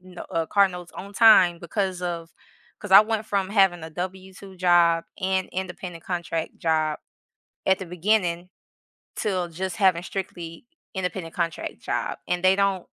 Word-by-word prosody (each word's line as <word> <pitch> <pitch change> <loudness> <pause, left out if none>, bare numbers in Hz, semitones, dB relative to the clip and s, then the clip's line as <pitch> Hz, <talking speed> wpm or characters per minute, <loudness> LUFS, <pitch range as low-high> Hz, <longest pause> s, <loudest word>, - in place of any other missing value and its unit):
no 180 -1 -11
uh, 165 -1 -1
car 200 +2 +4
notes 180 -1 -9
on 200 +2 -9
time 185 -7 +6
because 185 +1 -2
of, 170 -2 -4 0.5
'cause 210 - -9
I 195 - +11
went 220 0 -1
from 195 -2 0
having 195 -5 +3
a 160 - -6
W-2 190 +2 -7
job 170 -2 +4 0.2
and 190 0 0
independent 180 -2 -6
contract 170 -3 -3
job 155 -2 0 0.7
at 190 0 +3
the 190 - -5
beginning 180 -1 0 0.7
to 185 -4 -1
just 185 +2 -4
having 185 -4 +3
strictly 175 -3 -6 0.3
independent 180 -3 -4
contract 170 -2 -3
job, - - -3
and 180 +1 -1
they 190 +1 +5
don't 195 -2 0
180 Hz, 150 wpm, -24 LUFS, 170-190 Hz, 0.7 s, I